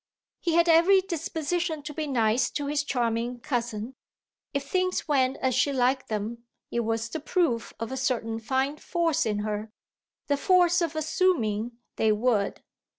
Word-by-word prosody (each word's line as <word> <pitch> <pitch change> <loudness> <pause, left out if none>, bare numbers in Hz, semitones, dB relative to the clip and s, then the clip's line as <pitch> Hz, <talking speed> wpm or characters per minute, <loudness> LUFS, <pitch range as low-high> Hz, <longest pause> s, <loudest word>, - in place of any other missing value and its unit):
He 335 -2 0
had 340 0 +4
every 340 +4 +6
disposition 330 -2 -2
to 295 +1 -6
be 310 0 -3
nice 235 -3 +2
to 290 - -3
his 290 0 0
charming 240 -2 -1
cousin; 235 -3 -3 0.6
if 280 -1 -3
things 370 +1 0
went 265 -3 +2
as 260 -1 0
she 285 - +2
liked 260 0 +1
them 220 +2 -3 0.3
it 235 - 0
was 225 0 -1
the 320 - -5
proof 280 - 0
of 230 +1 -4
a 265 - -3
certain 230 -4 -1
fine 265 +5 -1
force 335 -6 0
in 205 -1 -1
her 210 +1 -3 0.6
the 285 - +1
force 355 +1 +4
of 330 -2 -1
assuming 245 - +1 0.2
they 220 - +3
would. 215 -2 0
265 Hz, 160 wpm, -27 LUFS, 230-320 Hz, 0.6 s, every